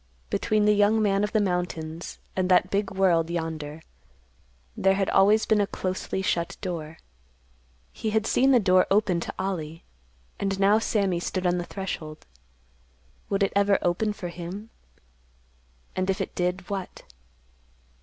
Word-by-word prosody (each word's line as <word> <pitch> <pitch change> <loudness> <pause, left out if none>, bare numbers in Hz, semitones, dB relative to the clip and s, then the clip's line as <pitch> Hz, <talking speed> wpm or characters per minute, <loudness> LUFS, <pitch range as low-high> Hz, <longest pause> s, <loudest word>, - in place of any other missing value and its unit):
Between 215 -1 +1
the 210 - +5
young 205 +2 +3
man 200 -2 +2
of 210 - -1
the 215 - +2
mountains 175 -4 -3 0.2
and 185 -1 0
that 185 0 +4
big 200 0 0
world 180 -4 +2
yonder 160 -2 -4 0.9
there 195 0 +3
had 195 -1 0
always 210 +3 +4
been 215 -2 +3
a 200 - +1
closely 185 0 -3
shut 170 -2 -1
door. 165 -4 -5 1.0
He 220 - -3
had 220 0 +1
seen 265 +2 +3
the 255 -2 +6
door 185 -3 +4
open 195 -3 +2
to - - -5
Ollie, 165 -4 -4 0.6
and 195 -1 -1
now 200 +2 +5
Sammy 200 -6 0
stood 185 +1 -3
on 180 0 +2
the 175 - -4
threshold. 160 -6 -6 1.0
Would 200 0 +1
it 195 - 0
ever 200 0 +4
open 180 +5 +1
for 180 -4 -6
him? 180 +6 -7 1.2
And, 185 +1 -1
if 190 - 0
it - - -3
did, 180 +1 -2
what? 195 -2 -5
190 Hz, 155 wpm, -26 LUFS, 175-205 Hz, 1.2 s, the